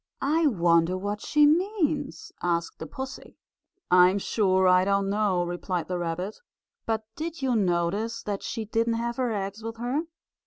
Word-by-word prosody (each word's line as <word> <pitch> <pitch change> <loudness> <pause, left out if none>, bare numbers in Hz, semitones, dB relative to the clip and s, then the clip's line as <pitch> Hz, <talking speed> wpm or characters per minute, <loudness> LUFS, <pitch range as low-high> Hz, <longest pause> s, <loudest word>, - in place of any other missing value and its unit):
"I 310 +3 +2
wonder 170 - +3
what 205 +2 -4
she 300 0 +4
means?" 310 - 0
asked 170 -1 -1
the - - -6
pussy. 265 -1 -8 0.5
"I'm 180 +2 +6
sure 190 -2 +2
I 180 0 +5
don't 195 0 +1
know," 200 -4 +1
replied 175 -1 -3
the 180 -1 -2
rabbit. 175 +4 -3 0.5
"But 220 -1 -1
did 325 -1 -5
you 255 -2 +2
notice 200 +4 0
that 205 -1 -3
she 225 -2 -4
didn't 230 +2 0
have 235 +1 -3
her 250 -3 0
eggs 200 0 -4
with 225 +1 -6
her?" 255 +7 -1
210 Hz, 160 wpm, -26 LUFS, 180-245 Hz, 0.5 s, I'm